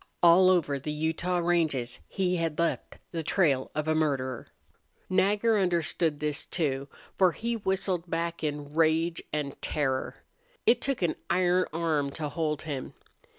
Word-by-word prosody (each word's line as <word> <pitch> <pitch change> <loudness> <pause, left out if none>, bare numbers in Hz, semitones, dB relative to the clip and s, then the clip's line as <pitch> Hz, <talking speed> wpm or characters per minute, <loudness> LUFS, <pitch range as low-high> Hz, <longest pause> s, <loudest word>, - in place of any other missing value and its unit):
All 175 +2 +7
over 150 -6 +2
the 150 +3 -4
Utah 160 +4 -1
ranges 160 -8 0
he 180 -2 0
had 165 -2 -2
left 170 0 -1
the 165 - -2
trail 145 -5 +1
of 155 0 -2
a 155 - +3
murderer. 135 -6 -1 0.6
Nagger 205 +4 +3
understood 170 -4 +1
this, 150 -1 -2
too, 140 -5 -2 0.3
for 185 -3 +5
he 235 +1 -2
whistled 190 -4 -1
back 170 0 -2
in 145 -1 -3
rage 165 +1 +2
and 145 -2 -3
terror. 135 -3 -1 0.5
It 240 +1 +4
took 275 -8 -1
an 170 - 0
iron 180 +1 +3
arm 155 -3 0
to 155 -2 -3
hold 150 -1 -2
him. 145 -4 -5
165 Hz, 150 wpm, -28 LUFS, 150-180 Hz, 0.6 s, All